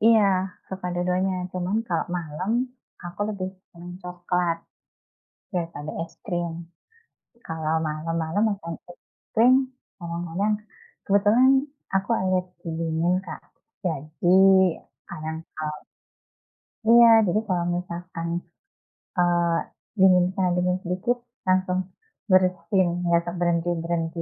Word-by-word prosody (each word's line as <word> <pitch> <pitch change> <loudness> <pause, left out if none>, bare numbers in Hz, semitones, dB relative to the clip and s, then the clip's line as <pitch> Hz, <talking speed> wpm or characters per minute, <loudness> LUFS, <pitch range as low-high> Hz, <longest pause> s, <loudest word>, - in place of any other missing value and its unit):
Iya, 220 -1 +6 0.4
suka 190 -1 -5
dua-duanya, 180 +2 +1 0.2
cuman 185 +3 -1
kalau - - 0
malam, 170 +4 -3 0.5
aku 175 +3 -8
lebih 195 -3 -3 0.2
seneng 175 +1 -10
coklat, 180 -1 -1 0.9
daripada 165 -5 -4 0.2
es - - -20
krim. 175 -4 -2 0.9
Kalau 160 -1 -2
malam-malam 160 +4 -1
makan 170 -5 -4 0.2
es 175 - -13 0.4
krim, 240 +3 +6 0.5
kadang-kadang 170 +5 -1 0.5
kebetulan 210 +6 +5 0.4
aku 195 +4 0
alergi 185 -1 -2
dingin 165 +1 +1
Kak, - - -7 0.4
jadi 160 +3 +1 0.7
kadang 160 -1 -5 0.2
kalau 150 -1 -4 1.2
iya 235 0 +9 0.2
jadi 180 +4 +2
kalau 180 -3 0
misalkan 175 -1 -5 0.9
eee, 175 -1 +3 0.4
dingin 185 -1 +6
kalau 185 -2 +2
dingin 180 0 +1
sedikit 185 +8 0 0.3
langsung 185 0 +2 0.5
bersin, 185 0 +3 0.2
enggak 170 0 +2
berhenti-berhenti. 170 -1 0
175 Hz, 100 wpm, -25 LUFS, 170-185 Hz, 1.2 s, iya